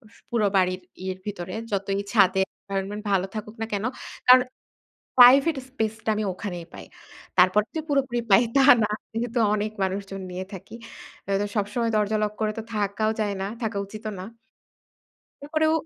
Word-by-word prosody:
স - - -21
পুরো 225 -3 +2
বাড়ির 185 0 +1 0.2
ইয়ের 185 0 -4
ভেতরে। 185 -3 -5 0.2
যতই 195 0 -1
ছাদে 190 -3 +4
এনভায়রনমেন্ট 200 +1 -5
ভালো 190 -1 +2
থাকুক 215 +1 -6
না - - 0
কেনো? 210 +4 -1 0.4
কারণ 255 0 +9 0.8
প্রাইভেট 270 +5 +8
স্পেস 220 -4 -2
টা - - 0
আমি 215 - -1
ওখানেই 175 -4 -6
পাই। - - -9 0.5
তারপরে 185 +4 +5
যে 320 - -1
পুরোপুরি 265 -4 +1
পাই 195 +5 +7
তা 275 - +6 0.2
না। - - 0 0.2
যেহেতু 235 +1 -2 0.2
অনেক 210 +1 -2
মানুষজন 195 0 -3
নিয়ে 185 +1 -5
থাকি। 195 +4 -9 0.5
আ - - 0
তো - - 0
সবসময় 220 +3 0
দরজা 210 +1 +1
লক 210 0 -1
করে 215 -1 +1
তো - - -5
থাকাও 210 +1 0
যায় 205 -1 -1
না। 195 - -2 0.2
থাকা 220 -2 -2
উচিতও 215 +2 -7
না। 185 - -6 1.2
এরপরেও 315 +2 +1
210 Hz, 165 wpm, -25 LUFS, 195-230 Hz, 1.2 s, কারণ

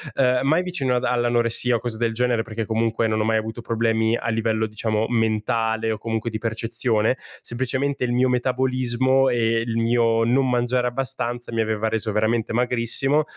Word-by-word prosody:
uhm, 125 -1 +3
mai 155 +6 +3
vicino 150 -9 -1
ad 125 - 0
all'anoressia 120 0 +1
o - - 0
cose 115 -1 -4
del 115 0 0
genere 120 0 +1
perché 115 0 -4
comunque 115 +1 0
non 110 0 0
ho - - +1
mai 110 0 +2
avuto 110 +2 -4
problemi 115 0 +1
a - - -5
livello 110 -1 0
diciamo 110 0 -1
mentale 110 0 0
o - - -5
comunque 110 +1 -3
di 110 - -4
percezione, 115 +1 0 0.2
semplicemente 130 +3 -2
il 125 - 0
mio 125 +1 +2
metabolismo 130 +1 +1
e 115 -1 +1
il 115 -1 -2
mio 115 0 +2
non 130 +3 +2
mangiare 125 0 +1
abbastanza 120 -2 -4
mi 115 - +1
aveva 110 0 -1
reso 110 0 -1
veramente 110 +2 0
magrissimo. 125 +5 +1
115 Hz, 175 wpm, -23 LUFS, 110-125 Hz, 0.2 s, uhm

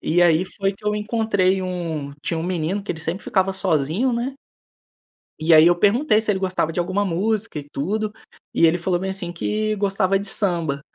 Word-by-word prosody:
E 175 +2 +2
aí, 170 0 +4
foi 195 +1 -2
que 205 +2 -20
eu 210 - +2
encontrei 210 -3 +1
um 165 -6 -4
tinha 165 - -2
um - - -3
menino 180 +2 -1
que 200 - -6
ele 160 - -10
sempre 165 +5 -4
ficava 190 -1 +1
sozinho, 185 - 0
né 240 +3 -2 1.1
e 160 +2 +3
aí 155 +1 +8
eu 175 - +5
perguntei 215 - +3
se 220 -1 0
ele 190 - -1
gostava 185 -4 -1
de - - -2
alguma 185 +4 0
música 200 +1 -1
e - - -8
tudo, 210 +10 -2 0.4
e - - +4
ele 165 +1 +3
falou 175 0 -1
bem 190 0 -2
assim, 185 -3 -5
que 215 +5 -1
gostava 195 -1 +1
de 200 - -5
samba. 170 -9 -1
190 Hz, 205 wpm, -22 LUFS, 170-210 Hz, 1.1 s, aí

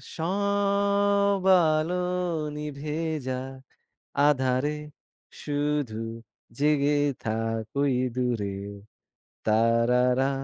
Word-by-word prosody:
সব 200 +2 +1 0.3
আলো 155 +3 0 0.6
নিভে 150 0 -5 0.3
যাক 130 +1 -4 0.7
আঁধারে, 130 +1 +1 0.7
শুধু 145 -6 -1 0.6
জেগে 145 0 +3 0.3
থাক, 115 0 -2 0.2
ওই 140 -2 +2 0.2
দূরে। 115 -6 -1 0.9
তারারা, 120 +4 +3
140 Hz, 65 wpm, -26 LUFS, 125-160 Hz, 0.9 s, জেগে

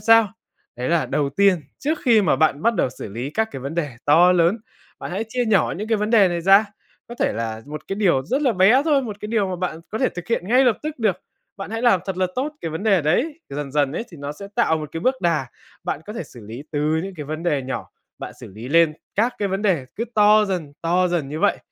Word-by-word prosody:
sao. 225 -2 +5 0.4
Đấy 125 +1 -3
là 170 -2 +2
đầu 145 -2 0
tiên, 195 +1 +3 0.2
trước 310 +3 -1
khi 230 -5 +5
mà 155 - +2
bạn 155 0 +2
bắt 230 0 +3
đầu 150 - +1
xử 125 - -8
lý 120 +7 -5
các 220 +7 0
cái 135 - -6
vấn 140 +5 -5
đề 145 -8 -3
to 170 +5 +6
lớn, 180 +5 +3 0.4
bạn - - -6
hãy 200 +5 -2
chia 245 +2 -1
nhỏ 200 -6 +2
những 210 +4 -5
cái 225 - +2
vấn 210 +1 -2
đề 210 -5 +6
này 175 -1 -2
ra, 195 +4 +6 0.4
có 240 - -7
thể - - +2
là 110 0 -4
một 150 +1 -8
cái 195 - -2
điều 170 -11 +2
rất 270 - 0
là 260 -4 +3
bé 210 +7 +5
thôi, 290 -4 +3
một 215 -5 -5
cái - - -5
điều 215 -4 +1
mà 185 - -3
bạn 175 -2 -3
có 220 - -3
thể 260 - +2
thực 175 -1 -9
hiện 205 -5 -1
ngay 255 +3 +5
lập 245 -4 +3
tức 305 -2 -5
được, 210 -6 +1 0.4
bạn 195 0 -7
hãy 225 +1 -3
làm 235 -7 +4
thật 190 -2 -3
là 185 0 +1
tốt 280 +4 -2
cái 165 - -4
vấn 160 +4 -5
đề 200 -6 +3
đấy. 270 - 0
Dần 140 -1 -5
dần 145 -2 +1
ấy 200 - -3
thì 170 - -12
nó 145 +1 -4
sẽ 200 +6 -10
tạo 230 -9 +3
một 155 -1 -6
cái 165 - -4
bước 255 +8 +2
đà, 165 -7 +1 0.4
bạn - - -2
có 210 - -6
thể 230 - -4
xử 125 - -14
lý 120 +6 -8
từ 145 - -1 0.2
những 195 0 -7
cái 150 - -6
vấn 155 +2 -5
đề 150 -6 0
nhỏ, 135 +1 -5 0.3
bạn - - -7
xử - - -9
lý 110 +6 -9
lên 165 +1 +4 0.2
các 235 +4 +1
cái 200 -1 0
vấn 195 +2 -2
đề 170 -11 +1
cứ 230 - -1
to 210 0 +6
dần, 175 -8 -3
to 180 +2 +2
dần 170 -6 -1
như 150 +2 -5
vậy 205 - +2
185 Hz, 275 wpm, -22 LUFS, 150-220 Hz, 0.4 s, to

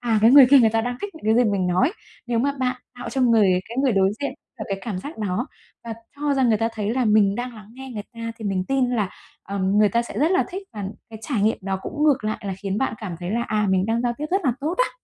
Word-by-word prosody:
à, 230 -3 +1
cái 225 - +7
người 270 -1 +9
kia 280 - +9
người 225 -3 +5
ta 225 - +1
đang 245 +2 -3
thích 410 -3 -6
những 320 - -13
cái 230 +3 +4
gì 215 - +2
mình 195 -2 0
nói. 185 - +2 0.3
Nếu 240 -1 0
mà 280 +4 +1
bạn 255 -1 0 0.2
tạo 240 -1 -6
cho 265 - -2
người 210 -7 +4
cái 235 - -8
người 265 - +3
đối 195 -1 +3
diện 280 - -2 0.3
được - - -4
cái 195 - -2
cảm 210 -6 -4
giác 290 - -8
đó 215 +5 -2 0.4
và 225 -1 -5 0.2
cho 290 -1 0
rằng 260 -3 +2
người 215 -2 +3
ta 225 0 +1
thấy 210 -1 -2
là 260 - +1
mình 210 -2 +4
đang 245 +1 -4
lắng 215 -2 -12
nghe 265 0 -9
người 215 -4 -5
ta 230 0 -5
thì 220 - -9
mình 190 -2 -1
tin 265 -2 +1
là, 215 -6 0 0.3
ờm, 195 0 0
người 210 0 +5
ta 235 +3 +1
sẽ 235 - -7
rất 310 +4 +3
là 375 - +3
thích 385 +2 -6
và 205 -2 -5 0.3
cái 220 - -9
trải 235 -9 -1
nghiệm 220 +2 +2
đó 190 0 -3
cũng 300 0 -2
ngược 280 -7 +3
lại 215 - -1
là 195 - -2
khiến 195 +1 -2
bạn 265 -3 -1
cảm 190 -6 -6
thấy 175 - -4
là: 235 +3 0
"À, 215 -3 0
mình 190 +1 +2
đang 230 +1 0
giao 240 -1 +1
tiếp 300 - -3
rất 385 +2 +2
là 255 - +3
tốt" 315 +5 -1
á. - - +2
230 Hz, 300 wpm, -23 LUFS, 205-260 Hz, 0.4 s, người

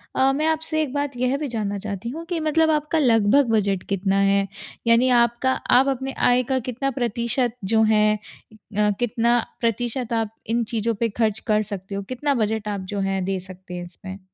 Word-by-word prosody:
अ, 265 +1 +4
मैं 305 +3 0
आपसे 315 0 0
एक 285 -3 -3
बात 285 -2 -2
यह 255 +2 +1
भी 295 -1 -3
जानना 210 -4 -2
चाहती 205 +2 -5
हूँ 325 +5 -6
कि 340 -2 -2
मतलब 315 +1 +2
आपका 305 +1 +1
लगभग 235 0 +4
बजट 200 -4 +1
कितना 195 0 +1
है? 195 0 +3 0.4
यानी 235 +3 +5
आपका 240 +2 0
आप 260 +1 +3
अपनी 270 0 -1
आय 245 +1 +3
का 260 +1 0
कितना 275 +3 -1
प्रतिशत 240 0 -1 0.2
जो 220 0 +5
है 215 0 +4
अ, 210 0 -4
कितना 240 0 +2 0.2
प्रतिशत 240 +1 -1
आप 225 -1 -1 0.2
इन 235 +1 +1
चीज़ों 225 0 0
पे 230 -1 +1
खर्च 215 0 0
कर 215 0 +3
सकते 195 +1 -6
हो? 200 - -2
कितना 255 +6 -1
बजट 220 -2 -1
आप 205 -1 -2
जो 200 - -2
हैं 190 -1 -1
दे 190 -1 -1
सकते 185 0 -11
हैं 175 0 -5
इसमें? 190 +2 -10
230 Hz, 195 wpm, -23 LUFS, 205-265 Hz, 0.4 s, यानी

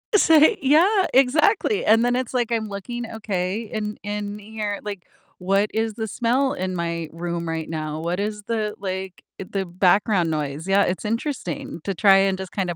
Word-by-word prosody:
So 325 -5 +5
i 310 +8 +6
yeah, 350 +9 +4
exactly, 310 - +3
and 225 +2 +5
then 245 0 +2
it's, 255 -1 -3
like, 240 -2 0
I'm 220 -2 0
looking 225 +4 -6
okay, 200 -2 -2
in 210 -1 -4
in 205 0 -4
here, 210 -1 -4
like, 200 -3 -6 0.3
"What 195 +3 +1
is 220 0 -1
the 220 +1 -4
smell 250 +6 +1
in 185 0 -3
my 170 -1 -3
room 170 0 -4
right 160 -1 -3
now? 155 -1 -4
What 175 +2 -2
is 210 0 -3
the, 215 -1 -2
like 190 -1 -5 0.2
the 195 0 -3
background 180 0 +2
noise?" 150 +2 -3
Yeah, 195 +1 +4
it's 185 +3 -2
interesting 225 - -3
to 195 - -1
try 195 0 +5
and 195 -1 +2
just 190 -2 -7
kinda 180 -3 -2
205 Hz, 185 wpm, -23 LUFS, 180-230 Hz, 0.3 s, i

